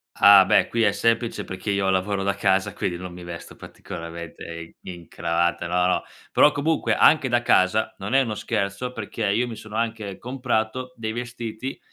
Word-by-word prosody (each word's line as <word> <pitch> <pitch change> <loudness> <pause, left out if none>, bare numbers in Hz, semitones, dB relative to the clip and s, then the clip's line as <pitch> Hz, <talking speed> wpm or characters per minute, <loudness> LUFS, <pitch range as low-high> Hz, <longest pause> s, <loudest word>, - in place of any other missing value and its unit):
Ah, 100 -1 +8
beh 105 - +4
qui 115 - -1
è - - +4
semplice 115 -2 0
perché 95 +2 -6
io 100 -1 +1
lavoro 95 +1 0
da 100 0 +1
casa, 100 0 +1
quindi 90 -3 -2
non 90 0 -8
mi 90 0 -10
vesto 85 -1 -9
particolarmente 85 0 -9
i 85 0 -8 0.2
in 85 -1 -14
cravatta 85 0 -1
no, 90 +1 +1
no, 90 - +1 0.3
però 150 - +6
comunque 155 +3 0
anche 150 -4 +5
da 120 0 +2
casa 110 +1 +3
non 100 +5 -4
è 135 - +6
uno 115 -5 -2
scherzo, 100 +4 -3
perché 110 -1 -4
io 110 +5 +1
mi 115 - -6
sono 110 0 -10
anche 110 -4 -3
comprato 125 0 -2
dei 110 -2 -4
vestiti 120 +1 -5
105 Hz, 185 wpm, -24 LUFS, 95-115 Hz, 0.3 s, Ah